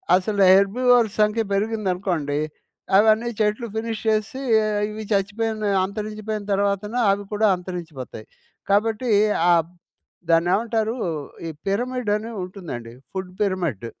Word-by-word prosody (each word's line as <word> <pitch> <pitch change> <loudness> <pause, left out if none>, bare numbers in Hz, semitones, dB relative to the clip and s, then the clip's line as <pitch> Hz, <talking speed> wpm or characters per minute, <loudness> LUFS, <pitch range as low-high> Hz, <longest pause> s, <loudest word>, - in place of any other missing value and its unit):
అసలు 200 +2 0
హెర్బివోర్స్ 220 +3 +4
సంఖ్య 210 +2 +2
పెరిగిందనుకోండి 190 -8 -1 0.6
అవన్నీ 220 +3 +4
చెట్లు 215 +2 0
ఫినిష్ 225 -1 -3
చేసి 215 +4 -1 0.5
ఇవి 215 +1 -6
చచ్చిపోయిన 215 +2 0 0.2
అంతరించిపోయిన 215 +1 -5
తర్వాతన 200 +2 0 0.2
అవి 205 +1 -1
కూడా 215 +1 +3
అంతరించిపోతాయి. 170 - -7 0.5
కాబట్టి 220 +4 +1 0.4
ఆహ్, 165 -1 +3 0.6
దాన్నేవంటారు? 215 +7 +2 0.5
ఈ - - -3 0.2
పిరమిడని 225 0 -1
ఉంటుందండి. 165 - -7 0.2
Food 190 -1 -5
pyramid. 175 - -1
210 Hz, 100 wpm, -23 LUFS, 185-220 Hz, 0.6 s, హెర్బివోర్స్